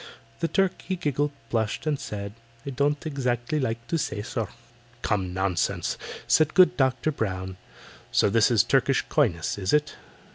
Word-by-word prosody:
The 165 - +1
Turk 190 +1 +1
he 190 - -3
giggled, 145 -4 0 0.2
blushed, 110 +2 -1
and 150 -3 0
said: 100 -1 -5 0.3
"I 140 - -3
don't 145 +3 0
exactly 135 -1 -1
like 115 -3 -2
to 165 - 0
say, 105 -7 -2
sir." 115 -2 -3 0.6
"Come, 95 -4 0
nonsense!" 95 -1 0 0.3
said 155 0 +3
good 180 -1 +6
DOCTOR 130 +2 +1
BROWN. 95 -7 -3 0.5
"So - - +4
this 105 +1 +4
is 115 -4 +4
Turkish 135 0 +2
coyness, 100 - +1
is 95 -1 -1
it? 150 0 +2
125 Hz, 155 wpm, -26 LUFS, 105-150 Hz, 0.6 s, good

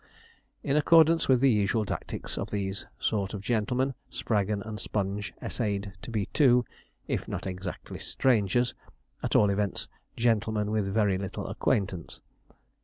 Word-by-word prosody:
In 140 - +1
accordance 165 +2 +5
with 130 -2 +4
the 135 -1 +6
usual 105 0 +2
tactics - - -5
of - - -3
these 100 -1 -3
sort 100 -1 -1
of 100 - -5
gentlemen, 125 +4 +1 0.2
Spraggon 105 -2 -1
and 110 -1 -6
Sponge 100 0 -2
essayed 100 -4 -2
to - - -8
be 110 -4 -1
two 125 -5 +5 0.4
if - - -2
not - - -4
exactly 95 -1 -6
strangers, 120 0 +2 0.5
at - - -1
all 105 -1 +5
events 100 -1 -1 0.3
gentlemen 110 -2 +1
with 105 -3 0
very 100 -3 +2
little 95 -1 -4
acquaintance. 95 -5 -1
105 Hz, 140 wpm, -28 LUFS, 100-120 Hz, 0.5 s, the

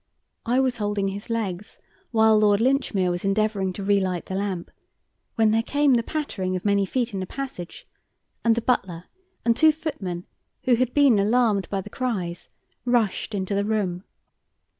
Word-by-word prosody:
I 245 +2 +3
was 260 -2 +1
holding 205 -2 -1
his 200 +3 -7
legs 210 -4 -3 0.3
while 220 -2 +4
Lord 205 -1 +4
Linchmere 230 -7 +1
was 175 0 -3
endeavouring 195 -1 +1
to 200 - -6
relight 190 -3 +1
the - - -6
lamp, 190 -3 -3 0.6
when 220 -1 +3
there 225 +1 +3
came 285 +3 +2
the 235 - +3
pattering 220 -10 -3
of 185 - -5
many 200 -1 +2
feet 245 +1 -1
in 195 - -2
the 185 - -4
passage, 265 -11 -7 0.6
and 230 -1 +4
the 235 - -1
butler 190 -9 -1 0.4
and 230 -1 +4
two 315 +5 +6
footmen, 195 - -5 0.4
who 255 - +3
had 250 +1 +1
been 275 -7 +5
alarmed 215 -1 +2
by 195 -1 -1
the 205 - -10
cries, 185 -10 -3 0.3
rushed 230 -3 0
into 190 0 -2
the 200 0 +1
room. 200 -4 -1
210 Hz, 170 wpm, -24 LUFS, 190-240 Hz, 0.6 s, two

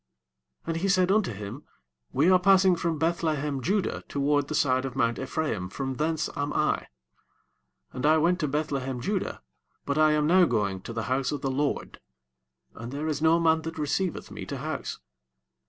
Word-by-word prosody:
18 - - -9
And 165 - -3
he 195 - +1
said 185 -1 +3
unto 210 - +2
him, 105 +7 -7 0.5
We 155 +8 +3
are 185 - +6
passing 190 0 +5
from 165 -1 -1
Beth–lehem–judah 160 +2 -1
toward 145 0 +1
the 155 - -3
side 130 -3 +2
of 135 -2 -5
mount 115 -3 +1
E'phra 155 +4 -1
im; 90 -4 -5
from 135 +4 -4
thence 155 0 0
am 145 +1 -2
I: - - 0 1.1
and 125 - -5
I 155 +1 +5
went 175 +3 +2
to 155 - 0
Beth–lehem–judah, 140 - -2 0.4
but 140 +2 0
I 155 0 +5
am 150 -1 +2
now 180 +3 +5
going 100 - -1
to 115 - -7
the 115 0 -3
house 130 +1 0
of 145 -2 -3
the 135 - -1
LORD; 140 +2 -2 0.7
and 115 +2 -8
there 145 +3 -3
is 150 -2 -2
no 160 +1 +4
man 160 -1 +3
that 165 0 -6
receiveth 160 +4 -2
me - - -7
to - - -4
house. - - -4
150 Hz, 185 wpm, -27 LUFS, 135-165 Hz, 1.1 s, are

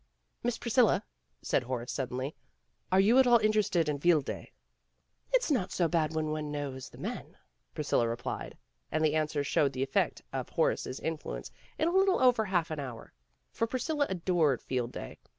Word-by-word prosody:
"Miss 240 -1 -1
Priscilla," 235 - +3 0.4
said - - +2
Horace 125 -1 -4
suddenly, 130 +2 -3 0.6
"are 185 - +5
you 220 +7 +6
at 260 - +6
all 240 -1 +7
interested 215 -6 +2
in 145 -1 -1
Field 160 -3 +4
Day?" - - -6 0.8
"It's - - +2
not 205 -10 +1
so 175 - +2
bad 160 -1 0
when 155 -1 0
one 155 -1 -3
knows 140 -3 -5
the - - -15
men," - - -6 0.4
Priscilla 115 - +1
replied, 120 +1 -4 0.3
and 155 0 +2
the 150 - +2
answer 155 -2 0
showed 140 0 +2
the 130 +1 -1
effect 135 - 0
of - - -3
Horace - - +1
's 130 - -5
influence 150 - -4 0.3
in 315 - +1
a - - -1
little 380 0 +4
over 245 -4 +4
half 175 -5 0
an 155 - -3
hour. 125 -5 -7 0.4
For 230 - -1
Priscilla 285 +4 0
adored 170 -7 +1
Field 125 -2 -2
Day. - - -8
160 Hz, 180 wpm, -30 LUFS, 135-220 Hz, 0.8 s, all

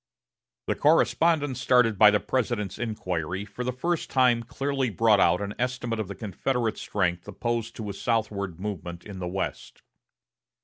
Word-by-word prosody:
The - - +1
correspondence 145 -6 +2
started 125 -6 +3
by 105 - +9
the 105 0 +3
President's 110 -4 -2
inquiry 95 -5 -3
for 105 +4 -6
the 125 - -1
first 165 +7 -2
time 125 -3 +3
clearly 135 +2 -2
brought 110 0 +3
out 90 - +4
an 100 0 -3
estimate 125 -2 -2
of 110 - -2
the 100 - -7
Confederate 115 +2 -2
strength 90 -3 -1
opposed 115 +3 -3
to 110 - -6
a 100 - -4
southward 100 -5 -2
movement 90 -4 -5
in 100 -3 -8
the 90 - -3
West. 95 +2 -5
110 Hz, 160 wpm, -26 LUFS, 100-125 Hz, -, by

